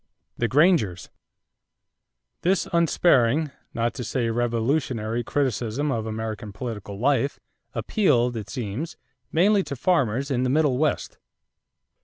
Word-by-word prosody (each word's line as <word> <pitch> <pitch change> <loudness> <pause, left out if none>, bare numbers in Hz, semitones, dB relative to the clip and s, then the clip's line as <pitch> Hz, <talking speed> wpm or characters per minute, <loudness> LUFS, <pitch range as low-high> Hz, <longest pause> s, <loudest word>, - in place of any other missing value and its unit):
=The 120 - 0
Grangers.= 135 - +2 1.3
This 185 +2 +1
unsparing, 155 -4 +3 0.2
not 115 0 0
to 125 - -5
say 115 0 -1
revolutionary, 120 0 0
criticism 130 +1 -1
of 110 -3 -2
American 110 -1 -4
political 105 -2 -6
life, 140 +3 +1 0.4
appealed, 125 - +2
it 110 -3 -5
seems, 125 +5 -4 0.3
mainly 200 +5 +4
to 140 -5 -5
farmers 140 - +1
in 125 -2 +1
the 130 - +1
Middle 140 -2 +2
West. 155 -1 -1
125 Hz, 115 wpm, -25 LUFS, 115-150 Hz, 1.3 s, mainly